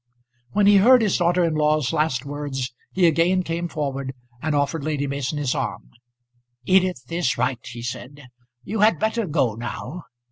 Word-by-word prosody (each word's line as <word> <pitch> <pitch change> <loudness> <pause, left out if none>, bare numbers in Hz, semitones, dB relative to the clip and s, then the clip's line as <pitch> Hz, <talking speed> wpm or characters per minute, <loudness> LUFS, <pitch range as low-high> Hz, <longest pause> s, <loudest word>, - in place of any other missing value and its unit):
When 205 0 +3
he 205 0 +7
heard 240 +4 +6
his 205 - +2
daughter 175 +1 +2
in 165 -2 +1
law's 150 -3 +1
last 150 -4 0
words 140 -3 -4 0.2
he 185 -1 +2
again 170 +3 +3
came 170 0 -3
forward, 140 -4 -4 0.3
and 155 -1 -1
offered 145 +2 0
Lady 150 -2 -1
Mason 140 +1 -3
his 145 -4 0
arm. - - -4 0.7
"Edith 185 -6 +2
is 170 -6 0
right," 125 -2 -1
he 120 -1 -8
said. 130 +3 -7 0.4
"You 210 - -4
had 210 -4 +4
better 220 +4 -1
go 145 -7 +1
now. 120 +8 -6
150 Hz, 170 wpm, -23 LUFS, 135-180 Hz, 0.7 s, he